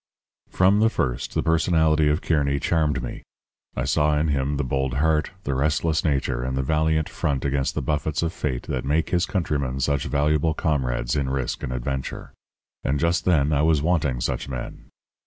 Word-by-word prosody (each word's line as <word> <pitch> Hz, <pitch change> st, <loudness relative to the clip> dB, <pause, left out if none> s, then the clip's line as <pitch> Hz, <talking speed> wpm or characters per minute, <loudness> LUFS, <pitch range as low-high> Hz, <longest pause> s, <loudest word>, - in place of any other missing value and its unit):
"From 95 Hz, +3 st, +3 dB
the 110 Hz, +1 st, +4 dB
first 60 Hz, -, -2 dB
the -, -, +1 dB
personality 80 Hz, -2 st, +3 dB
of 75 Hz, +3 st, 0 dB
Kearny 70 Hz, -3 st, +1 dB
charmed 75 Hz, -2 st, 0 dB
me. -, -, -6 dB, 0.5 s
I -, -, -1 dB
saw 75 Hz, 0 st, +2 dB
in 75 Hz, +1 st, +1 dB
him 70 Hz, 0 st, 0 dB
the 75 Hz, -, 0 dB
bold 65 Hz, 0 st, -1 dB
heart, 75 Hz, +2 st, +2 dB
the 70 Hz, -, -2 dB
restless 75 Hz, +3 st, +1 dB
nature, 65 Hz, -5 st, 0 dB
and 65 Hz, +1 st, -2 dB
the 65 Hz, -, 0 dB
valiant 80 Hz, +2 st, +1 dB
front 70 Hz, -1 st, -2 dB
against 70 Hz, -1 st, 0 dB
the -, -, -2 dB
buffets 75 Hz, +1 st, -1 dB
of 85 Hz, +1 st, -1 dB
fate 65 Hz, -5 st, -3 dB
that 65 Hz, -, -3 dB
make 75 Hz, +4 st, 0 dB
his 90 Hz, 0 st, +1 dB
countrymen 70 Hz, -8 st, -1 dB
such 70 Hz, +1 st, 0 dB
valuable 75 Hz, +2 st, +1 dB
comrades 65 Hz, -6 st, -1 dB
in 70 Hz, -3 st, 0 dB
risk 65 Hz, -2 st, -2 dB
and -, -, -4 dB
adventure. 65 Hz, +2 st, -4 dB, 0.5 s
And 70 Hz, +1 st, 0 dB
just 85 Hz, +1 st, +1 dB
then 75 Hz, -4 st, +3 dB
I 70 Hz, -, +2 dB
was 80 Hz, -2 st, +3 dB
wanting 75 Hz, -7 st, +1 dB
such -, -, -2 dB
men. 65 Hz, -2 st, -6 dB
75 Hz, 185 wpm, -24 LUFS, 65-80 Hz, 0.5 s, the